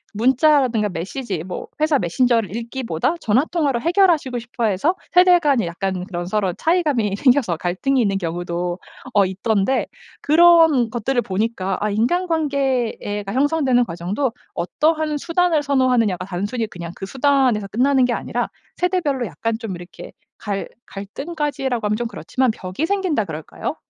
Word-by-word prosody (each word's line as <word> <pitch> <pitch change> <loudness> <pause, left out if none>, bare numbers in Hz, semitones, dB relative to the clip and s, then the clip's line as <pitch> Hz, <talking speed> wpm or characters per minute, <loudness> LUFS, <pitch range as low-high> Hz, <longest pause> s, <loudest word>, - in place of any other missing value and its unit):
문자라든가 255 -2 +3
메시지 190 - -4
뭐 180 0 -6 0.2
회사 310 -1 +3
메신저를 225 +2 +1
읽기보다 235 - -2
전화 240 +4 +2
통화로 290 -8 0
해결하시고 335 -6 +2
싶어 235 0 -3
해서 215 - +1 0.2
세대 360 0 +6
간의 280 - +2
약간 180 +1 -3
그런 175 -3 -5
서로 195 -2 0
차이감이 295 - +1
생겨서 245 - +2
갈등이 195 - 0
있는 200 -4 +1
경우도 175 0 -3 0.4
어 200 -1 +5
있던데 200 +5 0 0.3
그런 320 -6 +5
것들을 245 +2 -1
보니까 195 -1 -2
아 210 - 0
인간관계가 260 - -1
형성되는 270 -2 +2
과정도 195 +9 -2 0.2
어떠한 305 - 0
수단을 335 0 +1
선호하느냐가 250 -10 +1
단순히 205 +5 -3
그냥 170 -4 -8
그 195 - -7
수단에서 265 -4 +2
끝나는 255 +5 +2
게 245 - 0
아니라 - - -2 0.3
세대별로 320 -9 0
약간 230 0 -3
좀 225 -4 -5
이렇게 175 0 -11 0.3
갈 200 -2 -4 0.2
갈등까지라고 265 - -3
하면 210 - +1
좀 240 0 -2
그렇지만 255 +1 -1
벽이 190 +7 -4
생긴다 370 - 0
그럴까요? 160 -3 -5
240 Hz, 365 characters per minute, -21 LUFS, 195-285 Hz, 0.4 s, 세대